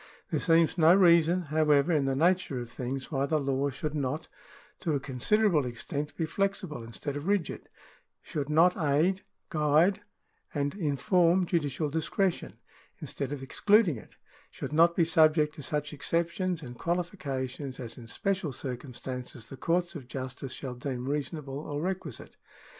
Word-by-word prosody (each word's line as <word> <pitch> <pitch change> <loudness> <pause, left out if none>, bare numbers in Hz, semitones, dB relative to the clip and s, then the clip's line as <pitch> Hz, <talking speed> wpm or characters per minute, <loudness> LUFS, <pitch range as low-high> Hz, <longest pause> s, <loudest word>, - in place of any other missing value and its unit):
There - - +1
seems 165 0 +3
no 165 +2 +7
reason, 175 -1 +5
however, 150 0 +3
in 150 -4 +2
the 135 0 +1
nature 170 -3 +2
of 120 -1 -7
things 130 +3 -4
why 140 -1 0
the 155 - +2
law 140 -1 0
should 145 +3 -4
not, 145 +1 -2 0.5
to 160 -5 0
a - - +1
considerable 150 - +2
extent, 140 +4 -5
be 165 - 0
flexible 195 - -2
instead 115 +5 -6
of 145 +4 -5
rigid 200 -5 -1 0.3
— - - -37
should 145 -1 -4
not 165 +4 +5
aid, 165 +4 +2 0.3
guide, 155 +6 +3 0.5
and 145 -1 0
inform 175 +2 +2
judicial 150 -3 -1
discretion, 165 +4 -1 0.4
instead - - -4
of 140 -2 -4
excluding 200 - +3
it - - -14 0.2
— - - -28
should - - -6
not 170 +2 +5
be 170 - +4
subject 155 -2 +4
to 150 - -9
such 150 0 -2
exceptions 170 +3 -1
and 125 -2 -9
qualifications 145 -7 -3
as 120 -3 -6
in 115 - -11
special 190 - -1
circumstances 125 -2 -6
the - - -7
courts 170 +5 0
of 140 -8 -8
justice 130 0 -6
shall 130 -3 -5
deem 125 0 -4
reasonable 145 -1 -3
or 145 -1 -4
requisite. 175 -6 -4
150 Hz, 160 wpm, -29 LUFS, 135-170 Hz, 0.5 s, no